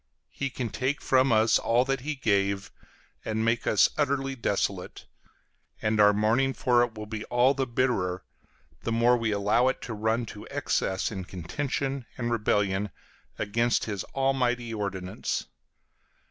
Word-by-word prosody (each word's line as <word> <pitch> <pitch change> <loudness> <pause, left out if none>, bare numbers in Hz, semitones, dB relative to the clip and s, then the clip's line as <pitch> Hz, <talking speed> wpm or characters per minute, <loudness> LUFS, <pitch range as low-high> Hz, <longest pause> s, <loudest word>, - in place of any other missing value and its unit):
He 140 - -3
can 125 -3 -4
take 135 +5 -1
from 130 0 +3
us 110 0 +4
all 120 +2 +2
that 135 0 0
he 150 +4 -3
gave, 100 -5 0 0.5
and 110 0 -1
make 115 +1 0
us 105 - +5
utterly 135 -1 +1
desolate; 100 -6 -2 0.7
and 110 0 0
our 105 0 +7
mourning 110 +6 +2
for 120 -2 +3
it 120 -2 0
will 105 0 -6
be 110 0 -5
all 125 +2 +3
the 135 -1 -1
bitterer, 105 -8 0 0.6
the 115 - -3
more 120 +2 +4
we 115 -2 0
allow 105 +5 +2
it 130 - 0
to 115 - -5
run 110 +2 0
to 105 -1 -10
excess 95 +2 -1
in 95 -3 -5
contention 135 - -3
and 120 -1 -2
rebellion 105 -3 +1 0.5
against 115 +3 +1
his 100 -4 -3
almighty 125 -3 0
ordinance. 95 -3 -3
115 Hz, 150 wpm, -27 LUFS, 105-130 Hz, 0.7 s, our